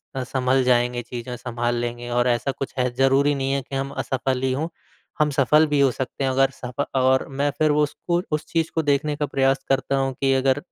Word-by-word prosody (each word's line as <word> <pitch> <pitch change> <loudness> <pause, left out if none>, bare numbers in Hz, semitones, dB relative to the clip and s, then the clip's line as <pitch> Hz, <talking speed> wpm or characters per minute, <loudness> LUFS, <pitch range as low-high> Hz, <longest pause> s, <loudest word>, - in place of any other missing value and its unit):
अ, 130 - -2
सँभल 130 +1 +1
जाएँगे 125 -1 +2
चीज़ें 120 +1 -6
सँभाल 120 0 -2
लेंगे 120 0 -4
और 120 +1 +1
ऐसा 120 +2 +1
कुछ 135 - -6
है 125 0 +2
ज़रूरी 135 +2 +3
नहीं 135 0 -1
है 140 0 0
कि 135 - -8
हम 135 +1 -2
असफ़ल 130 -1 -2
ही 130 - +1
हो, 155 +5 -2 0.5
हम 150 -1 +3
सफ़ल 145 +3 +4
भी 145 -1 +1
हो 140 -1 +5
सकते 130 +2 -4
हैं, 135 - +1
अगर 135 +1 +3
सफ 125 0 -9 0.2
और 130 0 +3
मैं 140 +1 -1
फिर 155 -1 +3
वो 150 0 +3
उसको 170 +4 -1
उस 155 - -4
चीज़ 165 -1 0
को 160 - +2
देखने 145 +1 +1
का 150 0 -1
प्रयास 135 -1 +1
करता 135 0 +1
हूँ 135 0 0
कि 135 -1 +3
अगर 135 0 +2
135 Hz, 230 wpm, -23 LUFS, 125-140 Hz, 0.5 s, हो